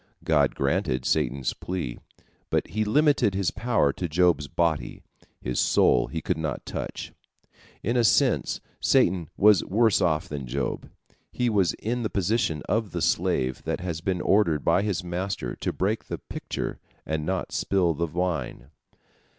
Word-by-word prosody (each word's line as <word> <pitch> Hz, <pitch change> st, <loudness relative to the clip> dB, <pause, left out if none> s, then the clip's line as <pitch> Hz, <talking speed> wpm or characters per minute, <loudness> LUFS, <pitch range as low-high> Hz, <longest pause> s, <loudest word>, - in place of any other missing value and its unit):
God -, -, +2 dB
granted 65 Hz, -2 st, 0 dB
Satan's 70 Hz, -3 st, 0 dB
plea, 85 Hz, -10 st, -5 dB, 0.5 s
but -, -, 0 dB
he 110 Hz, +5 st, 0 dB
limited 125 Hz, -2 st, +3 dB
his 95 Hz, -2 st, 0 dB
power 110 Hz, -, +1 dB
to 90 Hz, -, -4 dB
Job's 80 Hz, -3 st, +2 dB
body, 80 Hz, 0 st, -1 dB, 0.4 s
his 60 Hz, -, -2 dB
soul -, -, +3 dB
he 80 Hz, 0 st, -4 dB
could -, -, -1 dB
not 80 Hz, -1 st, -3 dB
touch. -, -, -5 dB, 0.7 s
In 115 Hz, +4 st, 0 dB
a 120 Hz, -, +3 dB
sense 110 Hz, -, +2 dB, 0.2 s
Satan 85 Hz, -3 st, +2 dB
was 105 Hz, -1 st, +6 dB
worse 110 Hz, +1 st, +2 dB
off 80 Hz, -3 st, +1 dB
than 70 Hz, -3 st, -5 dB
Job. 70 Hz, +2 st, -3 dB, 0.4 s
He 125 Hz, -1 st, 0 dB
was 95 Hz, -5 st, +2 dB
in 120 Hz, +3 st, -3 dB
the 110 Hz, -, -1 dB
position 95 Hz, -6 st, 0 dB
of 110 Hz, -2 st, -1 dB
the 85 Hz, -, -2 dB
slave 85 Hz, -7 st, 0 dB
that -, -, -2 dB
has 85 Hz, -3 st, -4 dB
been 90 Hz, 0 st, -1 dB
ordered 85 Hz, -8 st, +2 dB
by 85 Hz, +3 st, +4 dB
his 100 Hz, -4 st, -1 dB
master 90 Hz, -7 st, -3 dB
to -, -, -2 dB
break 105 Hz, +4 st, -1 dB
the -, -, -4 dB
pitcher -, -, -5 dB, 0.3 s
and 80 Hz, -1 st, -2 dB
not 95 Hz, +3 st, -2 dB
spill 90 Hz, -4 st, +1 dB
the 85 Hz, +3 st, -2 dB
wine. 85 Hz, -5 st, -3 dB
90 Hz, 160 wpm, -26 LUFS, 75-100 Hz, 0.7 s, was